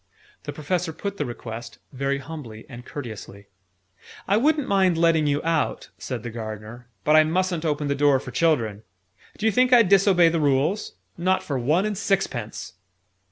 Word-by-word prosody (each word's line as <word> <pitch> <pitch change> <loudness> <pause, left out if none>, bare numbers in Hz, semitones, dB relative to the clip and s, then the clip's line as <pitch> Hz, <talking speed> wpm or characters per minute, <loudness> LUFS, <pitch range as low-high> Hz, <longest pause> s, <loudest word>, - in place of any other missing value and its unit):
The - - -4
Professor 170 +2 -2
put 200 +4 -5
the 145 - -2
request, 115 -1 -8 0.2
very 135 +1 -1
humbly 135 -7 -9
and 120 -1 -10
courteously. 110 -7 -8 0.8
"I 200 - +3
wouldn't 295 +5 +2
mind 190 -4 +3
letting 165 -2 +3
you 145 0 0
out," 165 -2 -1
said 125 -4 -5
the 120 - -5
Gardener. 110 +1 -8 0.2
"But 150 - +4
I 155 - +8
mustn't 175 +1 -1
open 150 -1 -1
the 140 - +1
door 140 -1 +3
for - - -9
children. 115 -11 +1 0.6
D'you 220 +1 +1
think 250 +4 +3
I'd 230 -6 +6
disobey 195 -3 +5
the 165 0 0
Rules? 145 +8 +1 0.3
Not 185 +2 +1
for 140 -3 -2
one 155 - +2
and 215 -1 -2
sixpence!" 180 - -2
155 Hz, 165 wpm, -24 LUFS, 125-185 Hz, 0.8 s, I